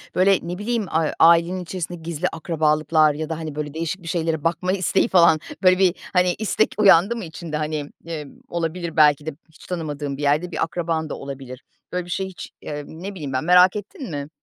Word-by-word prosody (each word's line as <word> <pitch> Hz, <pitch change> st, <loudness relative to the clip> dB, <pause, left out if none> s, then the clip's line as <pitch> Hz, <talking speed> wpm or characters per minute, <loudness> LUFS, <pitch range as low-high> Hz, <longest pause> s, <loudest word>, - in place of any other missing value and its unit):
böyle, 190 Hz, +1 st, +4 dB
ne 175 Hz, +1 st, -5 dB
bileyim, 220 Hz, +1 st, -1 dB
a 160 Hz, -1 st, +1 dB
ailenin 170 Hz, +2 st, +5 dB
içerisinde 175 Hz, 0 st, -5 dB
gizli 165 Hz, +1 st, -3 dB
akrabalıklar 155 Hz, -1 st, +2 dB
ya 155 Hz, +2 st, -5 dB
da, 160 Hz, -, -3 dB
hani, 155 Hz, -3 st, -6 dB
böyle, 150 Hz, -1 st, -4 dB
değişik 165 Hz, +3 st, -3 dB
bir -, -, -10 dB
şeylere 160 Hz, -2 st, -1 dB
bakma 175 Hz, +2 st, 0 dB
isteği 195 Hz, +2 st, +1 dB
falan, 170 Hz, -6 st, +5 dB, 0.2 s
böyle 185 Hz, 0 st, +5 dB
bir, 185 Hz, -2 st, +4 dB, 0.2 s
hani, 180 Hz, -1 st, +3 dB
istek 220 Hz, 0 st, +1 dB
uyandı 200 Hz, +1 st, +5 dB
mı 225 Hz, -5 st, -5 dB
içinde? 160 Hz, -1 st, -6 dB
Hani, 150 Hz, -1 st, -3 dB, 0.2 s
ııı, 160 Hz, -3 st, -5 dB, 0.2 s
olabilir 170 Hz, 0 st, -3 dB
belki 150 Hz, -1 st, +5 dB
de 160 Hz, -, -2 dB, 0.2 s
hiç 160 Hz, -, -17 dB
tanımadığın 150 Hz, -5 st, -4 dB
bir -, -, -7 dB
yerde 150 Hz, +5 st, +1 dB
bir -, -, -1 dB
akraban 165 Hz, -2 st, -2 dB
da -, -, -4 dB
olabilir. 135 Hz, -2 st, -8 dB, 0.3 s
Böyle 180 Hz, -1 st, -2 dB
bir -, -, -13 dB
şeyi 190 Hz, +1 st, -2 dB
hiç, 185 Hz, -, -9 dB
eee, 145 Hz, -1 st, -5 dB
ne 180 Hz, +5 st, -7 dB
bileyim 145 Hz, -6 st, -6 dB
ben, 130 Hz, +2 st, 0 dB
merak 180 Hz, +2 st, +6 dB
ettin 220 Hz, -, -7 dB
mi? 145 Hz, 0 st, -5 dB
165 Hz, 205 wpm, -22 LUFS, 155-180 Hz, 0.3 s, merak